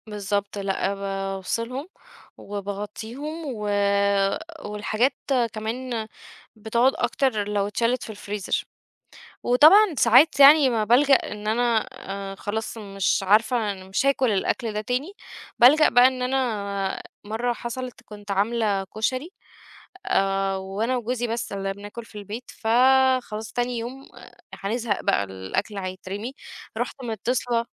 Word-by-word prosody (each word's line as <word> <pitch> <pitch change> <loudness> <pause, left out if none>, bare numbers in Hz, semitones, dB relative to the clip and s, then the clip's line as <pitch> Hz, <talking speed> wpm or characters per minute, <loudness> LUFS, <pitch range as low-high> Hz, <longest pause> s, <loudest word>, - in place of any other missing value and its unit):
بالضبط. 205 -1 -3
لأ، 195 0 -1
بافصلهم 195 - -3 0.5
وباغطّيهم 210 - -6
و 220 -7 -4 1.0
والحاجات 215 +5 0 0.4
كمان 225 +1 -4 0.5
بتقعد 235 +4 +2
أكتر 220 -7 0
لو 205 -1 0
اتشالت 230 +4 0
في - - -9
الفريزر. 205 -2 -3 0.8
وطبعًا 315 - +6
ساعات 265 +6 +5
يعني 280 -1 +8
ما 225 -3 +1
بالجأ 270 +6 +5
إن 210 -5 -3
أنا 230 0 +1 0.4
أ - - -7
خلاص 220 +3 -4
مش 195 -2 -1
عارفة 215 +2 +2
أنا 190 -1 -10
مش 195 +8 0
هاكل 265 -3 +3
الأكل 220 +3 -1
ده 210 - -2
تاني، 250 - -2 0.5
بالجأ 290 +6 +7
بقى 245 +1 +6
إن 255 -1 -1
أنا 210 -7 -1 0.2
مرّة 225 +4 -1
حصلت، 245 +1 -6
كنت 205 -1 -11
عاملة 205 0 +1
كشري، 255 - -3 0.8
آآ 195 - +1
وأنا 200 +6 -2
وجوزي 240 +1 -2
بس 230 -1 -3
اللي 195 0 -2
بناكل 205 +4 -9
في 210 - -11
البيت، 210 +5 -8
فخلاص 250 -2 +2
تاني 245 0 -1
يوم 255 +4 -7 0.5
هنزهق 220 +1 -2
بقى، 100 - +2
الأكل 95 - -4
هيترمي، 195 +5 -6 0.4
رُحت 265 - -4
مِتّصلة 235 +1 -1
220 Hz, 120 wpm, -24 LUFS, 200-250 Hz, 1.0 s, يعني